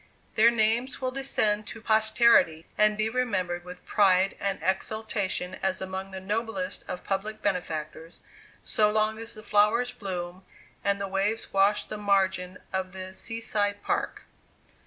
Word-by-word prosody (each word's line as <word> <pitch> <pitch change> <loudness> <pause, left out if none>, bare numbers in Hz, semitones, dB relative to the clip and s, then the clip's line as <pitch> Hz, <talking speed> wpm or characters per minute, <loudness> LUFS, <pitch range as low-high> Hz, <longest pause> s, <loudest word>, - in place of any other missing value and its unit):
Their 225 +2 +6
names 235 +3 +1
will 255 -1 -1
descend 215 -6 0
to 225 - -7
posterity, 220 -7 +4
and 210 0 +3
be 215 0 +1
remembered 190 -8 -1
with 180 0 -11
pride 195 -1 +3
and 200 -1 -1
exultation 190 -1 -1
as 190 -1 0
among 190 0 -5
the 190 -1 -7
noblest 225 +7 -3
of 180 - -5
public 210 +3 -3
benefactors, 165 -4 -3 0.4
so 210 -1 +2
long 215 +1 +1
as 230 +1 -7
the 215 - -11
flowers 215 +4 +3
bloom 180 -2 -6 0.4
and 200 0 +1
the 200 - -2
waves 195 +4 -1
wash 195 +2 +3
the 215 - -7
margin 190 -2 +1 0.2
of 190 -1 -2
the 185 0 -7
Sea 225 +4 -4
side 205 -2 0
Park. - - -2
205 Hz, 150 wpm, -27 LUFS, 190-220 Hz, 0.4 s, Their